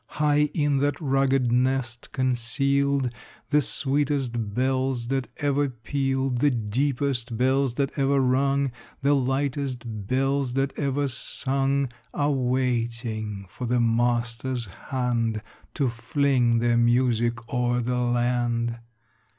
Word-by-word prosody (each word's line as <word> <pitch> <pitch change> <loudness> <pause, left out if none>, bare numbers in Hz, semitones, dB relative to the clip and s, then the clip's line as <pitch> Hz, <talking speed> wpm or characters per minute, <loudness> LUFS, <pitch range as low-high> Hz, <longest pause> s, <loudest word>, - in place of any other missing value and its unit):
High 150 0 +3
in 145 -3 +2
that 145 +1 0
rugged 135 -4 +2
nest 125 -1 0
concealed, 135 +1 +1 0.4
The 150 0 +5
sweetest 135 -6 0
bells 130 -1 0
that 135 -2 -1
ever 145 -1 +1
pealed, 135 +1 -1
The 145 - +4
deepest 125 +1 -1
bells 130 0 +2
that 140 -1 0
ever 140 0 +3
rung, 135 +1 +2 0.3
The 140 +1 +4
lightest 135 -1 -1 0.2
bells 135 0 0
that 135 0 0
ever 140 -1 0
sung, 135 +1 0 0.3
Are 145 0 +1
waiting 120 -5 -1
for 120 +6 -6
the 125 +1 +2
master's 120 +1 0 0.2
hand 115 -4 0 0.3
To 140 - +1
fling 120 0 +1
their 120 0 +2
music 120 0 +1
o'er 125 0 +1
the 125 +1 -1
land. 120 -1 0
130 Hz, 115 wpm, -25 LUFS, 120-140 Hz, 0.4 s, The